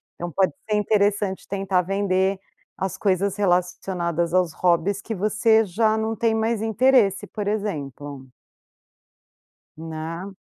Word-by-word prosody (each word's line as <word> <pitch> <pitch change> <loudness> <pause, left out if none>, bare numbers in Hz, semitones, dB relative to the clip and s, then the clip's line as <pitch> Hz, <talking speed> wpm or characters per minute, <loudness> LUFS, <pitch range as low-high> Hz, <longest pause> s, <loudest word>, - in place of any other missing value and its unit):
Então 175 0 -5
pode 190 +5 +1 0.2
ser 210 - +2
interessante 205 -2 +1
tentar 195 -2 +1
vender 190 0 0 0.4
as 190 -2 -3
coisas 195 -1 +1
relacionadas 175 -3 0
aos 180 -3 +2
hobbies 180 +3 +1
que 225 - -5
você 220 +2 +3
já 215 +4 +1
não 220 0 -1
tem 225 +1 +1
mais 220 0 0
interesse, 225 -1 +3
por 210 -2 -5
exemplo. 145 -10 -4 1.5
Né. 165 +4 -6
195 Hz, 120 wpm, -23 LUFS, 175-215 Hz, 1.5 s, você